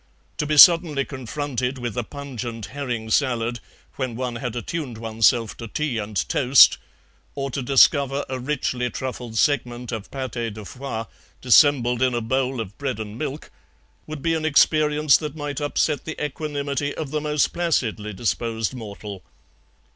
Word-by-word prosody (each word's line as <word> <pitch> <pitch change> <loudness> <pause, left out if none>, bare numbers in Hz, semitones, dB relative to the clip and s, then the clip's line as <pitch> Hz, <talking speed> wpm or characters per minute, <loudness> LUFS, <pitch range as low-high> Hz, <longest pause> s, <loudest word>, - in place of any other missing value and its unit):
To 150 - -1
be 150 0 0
suddenly 165 -4 +7
confronted 130 0 -4
with 120 -3 -4
a 120 - -1
pungent 120 -5 -6
herring 120 -6 -4
salad 120 -2 +1 0.4
when 130 -4 -3
one 125 -1 -3
had 120 -1 -4
attuned 125 0 -4
oneself 115 0 +1
to 115 - -7
tea 135 -1 -2
and 105 -1 -5
toast, 130 0 +6 0.6
or 135 -1 -3
to 135 - -3
discover 140 +1 +4
a 130 0 -4
richly 125 -2 -2
truffled 120 -1 -5
segment 125 -3 0
of 110 -3 -5
PATÉ 120 -5 -4
DE 105 -1 -9
FOIE 125 -1 -5 0.3
dissembled 125 -2 +4
in 130 -1 +2
a - - +1
bowl 130 +2 -1
of 105 -2 -6
bread 135 -6 -3
and 105 -1 -6
milk, 150 0 -5 0.6
would 155 -3 -7
be 165 - +2
an 160 -1 -1
experience 150 -1 +4
that 150 -2 -6
might 145 -2 -4
upset 145 0 0
the 160 - -6
equanimity 145 -1 -3
of 150 -4 -5
the 150 0 -1
most 150 -1 +1
placidly 115 -11 -1
disposed 115 +2 -2
mortal. 105 -4 -8
130 Hz, 155 wpm, -23 LUFS, 115-145 Hz, 0.6 s, suddenly